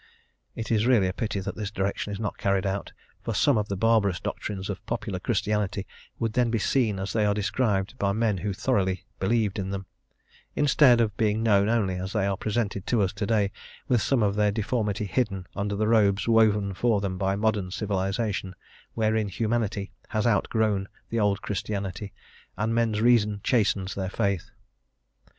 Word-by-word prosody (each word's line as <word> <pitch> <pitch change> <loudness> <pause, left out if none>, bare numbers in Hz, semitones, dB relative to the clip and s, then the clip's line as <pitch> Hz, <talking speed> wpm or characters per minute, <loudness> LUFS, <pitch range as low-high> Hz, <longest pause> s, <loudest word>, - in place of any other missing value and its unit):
It 115 - -4
is 110 +1 +2
really 115 -7 +4
a 90 - -2
pity 105 -2 -2
that - - -5
this 105 -2 -4
direction 100 0 -2
is 100 - -5
not 105 -2 -4
carried 100 -1 +1
out, 95 +1 -2 0.3
for 115 - -3
some 135 +6 +4
of 105 -1 0
the 100 - -3
barbarous 105 -4 +2
doctrines 95 -2 -4
of 100 - -5
popular - - -3
Christianity 105 -2 -1 0.3
would 115 -2 -2
then 120 0 +2
be 115 - +1
seen 110 -1 +1
as 95 +1 -3
they 110 - +2
are 105 -1 +2
described 105 +1 0
by 100 -1 +1
men 110 -1 +1
who 105 +3 -2
thoroughly 95 -3 0
believed 105 0 +1
in 95 0 -3
them, 95 0 -4 0.7
instead 140 -4 +5
of 105 -3 0
being 110 -1 +1
known 100 -2 +4
only 100 -6 +1
as 95 +2 -5
they 105 -3 +1
are 100 0 0
presented 105 -2 -2
to 115 -4 +2
us 95 - -1
to 105 -1 -3
day, 105 -3 +2 0.4
with 120 -3 +2
some 130 -5 +2
of 100 -1 +2
their 105 0 +2
deformity 105 -1 -1
hidden 100 -4 -1
under 100 0 -2
the 105 +1 0
robes 105 -3 +3
woven 105 -3 +3
for 110 +2 +2
them 95 -2 -3
by 95 0 +1
modern 105 -2 0
civilisation, 95 0 -2 0.4
wherein 110 -1 +1
humanity 110 0 -1 0.2
has 110 0 -1
outgrown 105 -3 +1 0.2
the 115 - 0
old 105 -1 +1
Christianity, 100 -1 -4 0.5
and 110 +2 0
men's 115 -2 +1
reason 110 -3 +3
chastens 100 -5 +1
their 95 -1 -3
faith. 100 0 -1
105 Hz, 180 wpm, -26 LUFS, 100-110 Hz, 0.7 s, instead